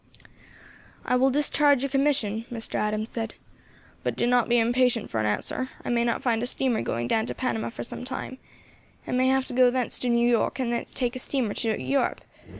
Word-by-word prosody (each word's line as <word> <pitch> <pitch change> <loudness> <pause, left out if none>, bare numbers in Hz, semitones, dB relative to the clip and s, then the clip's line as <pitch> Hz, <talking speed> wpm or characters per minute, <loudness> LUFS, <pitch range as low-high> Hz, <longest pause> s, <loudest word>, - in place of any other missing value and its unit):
"I 250 - +2
will 260 +2 +4
discharge 285 -1 +3
your 275 - -2
commission," 265 -6 +1
Mr. 230 -2 -6
Adams 215 +1 -1
said. 225 -1 -4 0.7
"But - - -2
do - - 0
not 245 -1 +3
be 240 - +4
impatient 240 0 +2
for 110 - -1
an 110 - +1
answer; 180 - -2 0.2
I - - -1
may 235 0 +2
not 235 -1 -1
find 230 -3 +1
a 245 - -1
steamer 250 -2 +1
going 120 +1 -2
down 220 - +1
to - - -4
Panama 240 -4 -2
for 230 - -6
some 235 - -7
time, 260 0 -5 0.7
and - - -2
may 255 +1 +3
have 265 0 +2
to - - -4
go 250 0 +5
thence 250 -1 0
to 250 - -1
New 235 0 +3
York, 235 -2 +1
and 245 -3 -1
thence 235 - -3
take 245 -1 -1
a - - -4
steamer 250 -5 -1
to 220 -2 0
Europe. 275 0 0
245 Hz, 215 wpm, -26 LUFS, 225-260 Hz, 0.7 s, go